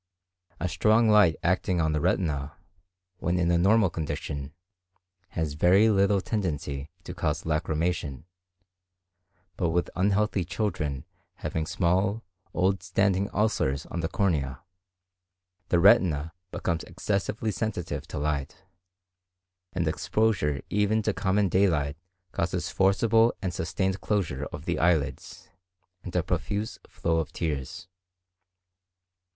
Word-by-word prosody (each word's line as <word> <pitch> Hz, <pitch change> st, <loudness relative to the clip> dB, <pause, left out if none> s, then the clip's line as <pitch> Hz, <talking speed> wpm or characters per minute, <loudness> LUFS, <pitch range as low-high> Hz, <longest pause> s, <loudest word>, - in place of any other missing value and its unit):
A 90 Hz, -, -1 dB
strong 110 Hz, +4 st, +3 dB
light 105 Hz, -7 st, +6 dB
acting 90 Hz, 0 st, +1 dB
on 80 Hz, -1 st, +2 dB
the 75 Hz, -1 st, 0 dB
retina, 75 Hz, -5 st, 0 dB, 0.7 s
when 90 Hz, +1 st, 0 dB
in 85 Hz, -1 st, +2 dB
a 85 Hz, -, +4 dB
normal 100 Hz, 0 st, +4 dB
condition, 75 Hz, -3 st, -4 dB, 0.9 s
has 80 Hz, -3 st, -1 dB
very 95 Hz, +8 st, +5 dB
little 100 Hz, -1 st, +3 dB
tendency 75 Hz, -9 st, -3 dB
to -, -, -7 dB
cause 75 Hz, -1 st, -1 dB
lacrymation; 80 Hz, -3 st, -1 dB, 1.3 s
but 85 Hz, -3 st, +1 dB
with 85 Hz, +1 st, 0 dB
unhealthy 100 Hz, +1 st, +1 dB
children 75 Hz, -11 st, -2 dB, 0.3 s
having 80 Hz, -1 st, -3 dB
small, 95 Hz, +5 st, +1 dB, 0.3 s
old 95 Hz, +2 st, +1 dB
standing 95 Hz, +1 st, +1 dB
ulcers 105 Hz, -10 st, 0 dB
on 85 Hz, -, -3 dB
the 80 Hz, -, -1 dB
cornea, 80 Hz, -, -1 dB, 1.1 s
the 85 Hz, -, +3 dB
retina 85 Hz, -4 st, +4 dB, 0.2 s
becomes 85 Hz, -3 st, -2 dB
excessively 100 Hz, +4 st, -2 dB
sensitive 105 Hz, -6 st, -3 dB
to -, -, -6 dB
light, 70 Hz, +3 st, -2 dB, 1.1 s
and 90 Hz, -3 st, -1 dB
exposure 80 Hz, -2 st, 0 dB
even 105 Hz, +2 st, +2 dB
to 110 Hz, -, +1 dB
common 100 Hz, +1 st, +1 dB
daylight 80 Hz, -7 st, +2 dB, 0.4 s
causes 85 Hz, +1 st, -2 dB
forcible 115 Hz, +4 st, +3 dB
and 95 Hz, -3 st, -3 dB
sustained 95 Hz, +3 st, -1 dB
closure 80 Hz, -10 st, -1 dB
of -, -, -8 dB
the -, -, -1 dB
lids, 80 Hz, -5 st, 0 dB, 0.5 s
and 90 Hz, -1 st, -8 dB
a 90 Hz, -, +2 dB
profuse 100 Hz, +5 st, -2 dB
flow 80 Hz, -1 st, -1 dB
of 80 Hz, -2 st, -3 dB
tears. 85 Hz, 0 st, -4 dB
90 Hz, 120 wpm, -27 LUFS, 80-100 Hz, 1.3 s, light